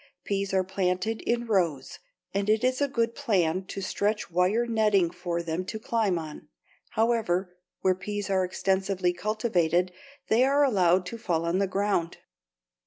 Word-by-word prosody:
Peas 200 0 -2
are 190 -1 +2
planted 190 +3 -1
in 240 0 +1
rows, 170 - 0 0.3
and 200 +1 -1
it 220 +1 +3
is 255 +2 +1
a 285 - +3
good 235 -3 0
plan 185 -5 +1
to 195 - -6
stretch 205 +1 -1
wire 185 +7 +2
netting 210 -6 +2
for 175 -1 -3
them 165 +2 -2
to 220 - -5
climb 215 -4 0
on. 155 -2 -7 0.4
However, 205 -6 0 0.3
where 185 - +3
peas 205 +2 -4
are 190 -1 +2
extensively 190 0 0
cultivated 180 -3 0 0.4
they 230 +3 +4
are 280 +2 +4
allowed 185 -8 +3
to 230 +5 -7
fall 170 -5 -1
on 170 +3 +1
the 200 - +2
ground. 195 -3 -1
195 Hz, 160 wpm, -27 LUFS, 180-220 Hz, 0.4 s, they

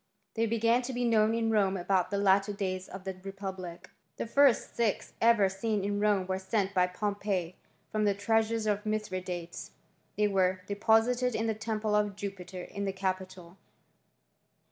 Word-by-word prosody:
They 225 0 +1
began 230 +2 +2
to 255 +1 -5
be 245 0 -1
known 220 -1 +3
in 225 -1 +1
Rome 195 -3 +2
about 185 0 +1
the 200 - -1
latter 200 +1 +3
days 185 -2 -3
of 190 0 -8
the 190 0 -4
republic* 190 -3 -7 0.3
The - - -2
first 275 +1 +3
six 230 -4 -1
ever 230 -3 +5
seen 200 +2 -2
in 205 0 -1
Rome 205 -3 +2
were 190 0 -2
sent 195 0 -1
by 180 -1 +3
Pompey 195 -2 -2 0.4
from 215 -1 +1
the 200 -1 +2
treasures 225 +2 +1
of 210 -1 0
Mithridates. 185 -5 -4 0.4
They 210 0 +3
were 185 -2 +1
depo* 220 +2 +3
sited 250 0 0
in 225 - 0
the 225 - +1
temple 215 0 -2
of 210 -1 +1
Jupiter 190 -2 -6
in 200 +2 -5
the 195 - -2
capitol. 185 -2 -4
200 Hz, 170 wpm, -30 LUFS, 190-220 Hz, 0.4 s, ever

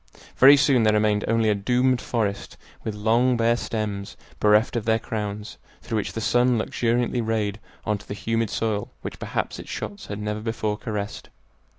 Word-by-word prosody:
Very 140 +2 +9
soon 140 -3 +4
there 110 -1 +4
remained 105 -1 +2
only 115 -1 +2
a - - +4
doomed 125 +5 +1
forest, 105 -4 -2 0.3
with 110 - -3
long 115 +4 +2
bare 115 +1 +3
stems, 105 -4 -4 0.2
bereft 105 +3 +4
of 115 - -1
their 110 0 +3
crowns, 105 -1 -5 0.2
through 110 - -2
which 105 - -2
the - - -3
sun 120 +3 +3
luxuriantly 120 +2 0
rayed 110 -2 -1 0.3
on 105 -1 0
to - - -16
the 100 - -5
humid 115 +1 -1
soil 105 -2 -1
which - - -6
perhaps - - -3
its - - -9
shots 205 - -6
had 100 - -5
never 105 0 -3
before 110 -1 -2
caressed. 105 -1 -5
110 Hz, 180 wpm, -24 LUFS, 105-120 Hz, 0.3 s, Very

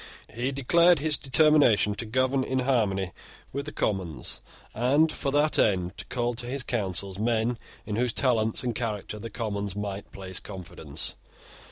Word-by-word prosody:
He 120 +4 -1
declared 170 +6 +4
his 150 +1 +1
determination 135 -6 +4
to 115 +2 -5
govern 130 +3 +1
in 130 - -1
harmony 105 -8 +1 0.4
with 140 +2 -3
the - - -4
Commons, 95 - -2 0.3
and, 140 +7 +3
for 140 - -2
that 145 +2 +2
end, 90 -2 +2
to 90 - -4
call 120 0 -1
to 120 +1 -5
his 130 +1 -2
councils 100 -4 -2
men 115 +1 +1 0.3
in 105 -1 -3
whose 125 0 +1
talents 115 -3 +2
and 120 -1 -1
character 105 -2 -3
the 115 +2 -6
Commons 100 -4 -3
might 100 -1 -5
place 95 -2 -5
confidence. 85 -7 -5
115 Hz, 160 wpm, -27 LUFS, 100-130 Hz, 0.4 s, declared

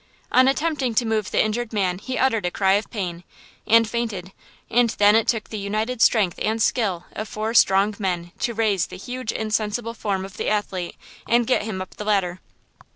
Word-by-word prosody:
On 255 +1 +5
attempting 275 -4 0
to 240 - +2
move 220 -3 -1
the - - +2
injured 220 +2 -2
man 190 -4 0
he 255 +5 -4
uttered 225 -8 +1
a - - +1
cry 190 +1 +2
of 205 +2 0
pain, 180 -6 -4 0.4
and 230 +1 +5
fainted, 215 -6 -3 0.4
and 240 0 +3
then 205 +1 +6
it 225 0 +3
took 225 -3 0
the 215 - -4
united 215 +4 -2
strength 200 -7 +3
and 220 +1 0
skill 200 -7 0
of 215 - -5
four 215 +1 -3
strong 200 -2 +4
men 175 -3 -2
to 235 - -1
raise 210 -5 +1
the - - -9
huge 250 +3 -4
insensible 220 +1 -2
form 200 -4 -2
of 195 +2 -12
the - - -1
athlete, 195 -4 -2 0.3
and 235 +1 +3
get 255 - +2
him 205 -3 -4
up 185 - -16
the 210 - -6
ladder. 190 -4 0
215 Hz, 200 wpm, -23 LUFS, 195-230 Hz, 0.4 s, then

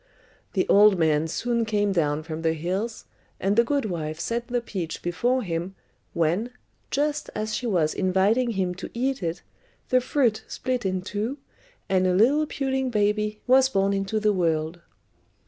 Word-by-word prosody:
The 185 - +1
old 205 -1 +6
man 160 -1 +2
soon 235 +7 -1
came 205 -2 +1
down 155 -4 0
from 160 0 -6
the 160 -1 +1
hills, 190 +8 -3 0.3
and 195 +2 +1
the 235 - +5
good 280 +1 0
wife 160 -5 -4
set 235 +6 -2
the 245 0 0
peach 185 -8 -5
before 245 +9 0
him, 175 +1 -3 0.4
when, 170 +8 +1 0.4
just 295 +1 -1
as 215 0 -2
she 245 +3 -2
was 170 -8 +1
inviting 200 +6 +2
him 185 -3 -1
to - - -5
eat 260 +1 -1
it, 170 0 -3 0.5
the 255 0 +4
fruit 240 -4 +1
split 250 -5 -2
in 185 -1 -2
two, 215 +7 -3 0.5
and 185 -1 +2
a 180 - +2
little 280 +10 +4
puling 265 -2 -1
baby 210 -1 0
was 260 +1 +5
born 195 -4 +1
into 195 +2 -1
the 210 -1 +2
world. 165 -2 -1
205 Hz, 165 wpm, -25 LUFS, 175-240 Hz, 0.5 s, old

